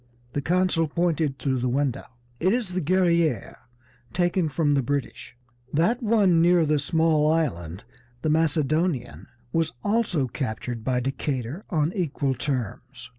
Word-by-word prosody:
The 145 - -1
consul 175 0 +1
pointed 160 -3 0
through 130 -2 -1
the 125 +1 0
window. 135 0 -1 0.3
"It 185 +4 +2
is 240 -5 -1
the 185 - 0
Guerrière, 170 - +1 0.6
taken 175 -2 +1
from 145 0 +1
the 140 - +3
British. 135 -1 -4 0.3
That 195 - +2
one 205 -7 +4
near 175 -1 +4
the 150 -1 +2
small 155 +1 +2
island, 95 - -2 0.4
the 155 - +1
Macedonian, 155 -3 0 0.3
was 165 -1 0
also 205 - +1
captured 120 -2 -4
by 125 +1 0
Decatur 135 - -3
on 160 -1 0
equal 145 -7 -1
terms. 125 -1 -4
155 Hz, 135 wpm, -25 LUFS, 135-175 Hz, 0.6 s, one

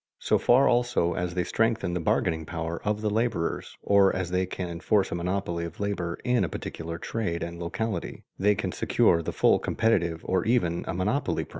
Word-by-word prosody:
So - - +1
far 130 +3 +5
also 120 -8 +2
as 90 0 -3
they 90 - +1
strengthen 110 -1 0
the 90 - -1
bargaining 80 0 0
power 80 +1 -4
of 105 0 -1
the 105 - 0
laborers, 110 -6 -1
or 100 -1 +5
as 90 -1 -3
they 90 0 +1
can 90 0 -4
enforce 95 +4 0
a - - -1
monopoly 85 -1 -2
of 85 0 -7
labor 95 -4 -2
in 125 -1 +2
a - - -1
particular 85 0 -6
trade 85 -2 -3
and 85 0 -6
locality, 95 +2 -4 0.2
they 105 +2 +3
can - - -2
secure 85 - +2
the - - -3
full - - +3
competitive 85 -8 +1
or 95 -1 0
even 100 -8 +1
a - - -2
monopoly 105 +10 0
price. - - -15
90 Hz, 195 wpm, -27 LUFS, 85-110 Hz, 0.2 s, far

